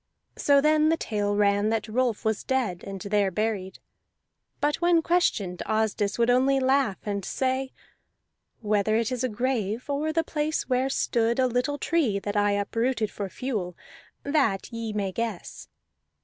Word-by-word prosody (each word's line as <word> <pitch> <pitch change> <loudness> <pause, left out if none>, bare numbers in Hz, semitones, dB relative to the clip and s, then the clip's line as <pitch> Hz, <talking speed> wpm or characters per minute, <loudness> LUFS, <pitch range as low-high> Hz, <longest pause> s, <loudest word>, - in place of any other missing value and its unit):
So 280 -1 +4
then 305 +1 +4
the 325 - +2
tale 205 -7 -1
ran 205 0 +2
that 220 -1 -1
Rolf 235 0 -1
was 220 -1 0
dead, 240 -10 -1
and 195 -1 -6
there 200 0 +1
buried; 190 -1 -2 0.8
but 295 0 +1
when 345 -1 +3
questioned 220 - +1
Asdis 215 -2 0
would 235 +1 +3
only 265 +2 +3
laugh 260 -5 +2
and 200 -2 -2
say: 260 +4 -1 0.9
"Whether 210 0 +1
it 230 +2 0
is 250 0 -2
a 255 - +1
grave, 230 -1 -2
or 300 +3 0
the 325 +1 +1
place 310 -1 -2
where 255 +1 +1
stood 235 -3 +1
a 260 - +3
little 250 +4 0
tree 290 -11 +1
that 205 +1 -4
I 205 0 +3
uprooted 225 +2 -1
for 200 -2 -5
fuel, 195 -6 -4 0.5
that 275 -8 0
ye 230 -1 -4
may 200 -2 -2
guess." 225 -2 -5
230 Hz, 160 wpm, -26 LUFS, 205-265 Hz, 0.9 s, So